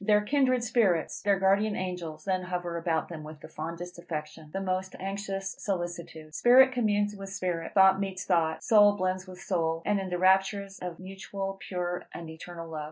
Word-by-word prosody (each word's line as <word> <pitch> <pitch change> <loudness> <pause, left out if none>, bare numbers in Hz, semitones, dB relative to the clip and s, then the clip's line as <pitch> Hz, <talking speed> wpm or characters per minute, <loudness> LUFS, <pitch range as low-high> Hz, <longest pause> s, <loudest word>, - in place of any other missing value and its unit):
Their 210 0 +4
kindred 255 +1 +2
spirits, 220 -9 +1
their 200 -1 +3
guardian 200 +2 +3
angels 180 -4 -5
then 185 -1 +1
hover 180 -1 -3
about 165 -1 0
them 165 -3 -7
with 155 0 -10
the - - -9
fondest 170 +3 -7
affection, 155 -2 -6
the 195 - -3
most 185 0 -2
anxious 195 0 -4
solicitude. 175 -4 -4
Spirit 255 +5 +6
communes 205 -4 +1
with 195 -1 -8
spirit, 180 -4 -3
thought 190 0 +6
meets 195 -1 -3
thought, 165 -3 +1
soul 205 -3 +6
blends 185 -1 -2
with 185 -1 -10
soul, 165 -3 -1
in 205 -1 +2
all 190 -1 -4
the 180 - -1
raptures 195 +2 +2
of 180 -2 -5
mutual, 195 +1 -6
pure, 180 -1 -4
and 165 -2 -7
eternal 165 +1 -8
love. 160 -1 -5
185 Hz, 180 wpm, -29 LUFS, 170-200 Hz, -, Spirit